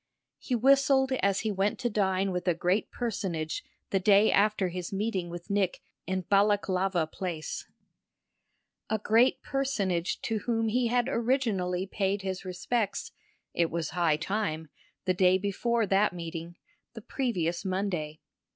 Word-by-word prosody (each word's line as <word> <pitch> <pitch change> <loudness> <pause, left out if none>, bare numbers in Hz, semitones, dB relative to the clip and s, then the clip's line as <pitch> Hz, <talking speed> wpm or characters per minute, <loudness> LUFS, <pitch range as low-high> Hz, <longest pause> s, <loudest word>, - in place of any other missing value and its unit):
He 255 - -2
whistled 270 +2 +4
as 195 0 +2
he 220 - -1
went 200 +1 0
to 250 - -1
dine 195 -3 +1
with 180 0 -3
a 175 - +3
great 180 +5 0
personage 185 -9 -3 0.3
the 195 - +2
day 200 +2 +5
after 205 -2 +2
his 180 0 -5
meeting 195 -3 -2
with 175 +3 -7
Nick 200 -3 +1 0.3
in 185 0 -1
Balaklava 195 -3 +2
Place; 170 -5 -5 1.2
a 220 - +1
great 225 +4 +3
personage 200 -11 -1
to 225 -1 -1
whom 225 0 0
he 245 +2 +1
had 245 +1 +1
originally 225 -8 0
paid 195 0 -1
his 190 -1 -3
respects 195 +4 -2 0.4
it 170 -1 +1
was 165 -1 -3
high 170 -4 +2
time 160 -3 -2 0.4
the 185 - +2
day 185 0 +4
before 220 +4 0
that 195 +1 +2
meeting, 170 0 -6 0.4
the 225 - -7
previous 180 - -2
Monday. 185 -6 -2
195 Hz, 140 wpm, -29 LUFS, 180-220 Hz, 1.2 s, day